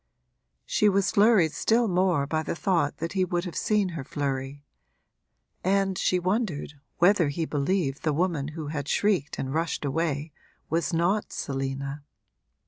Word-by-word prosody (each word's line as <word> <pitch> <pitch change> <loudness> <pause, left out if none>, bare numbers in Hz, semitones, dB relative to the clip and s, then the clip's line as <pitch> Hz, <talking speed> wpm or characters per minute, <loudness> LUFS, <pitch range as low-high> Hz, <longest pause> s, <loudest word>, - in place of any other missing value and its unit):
She 210 - +3
was 195 -1 +2
flurried 205 -6 +5
still 225 +9 +2
more 180 -6 +2
by 155 +2 -1
the 160 - -3
thought 165 -5 0
that 165 +2 -4
he 190 -2 +2
would 175 0 -1
have 175 - -6
seen 210 -3 +1
her 165 -5 -5
flurry, 140 0 -3 1.0
and 195 0 +2
she 185 - +1
wondered 185 -5 -1 0.2
whether 175 -3 +4
he 160 +3 -2
believed 145 -1 -1
the 155 - +1
woman 160 -2 0
who 155 -2 -4
had 145 -2 -4
shrieked 190 -8 +1
and 130 0 -3
rushed 165 -1 -1
away 150 +1 -1 0.4
was 165 -3 0
not 175 +6 +1
Selina. 135 +1 -4
165 Hz, 150 wpm, -27 LUFS, 145-190 Hz, 1.0 s, flurried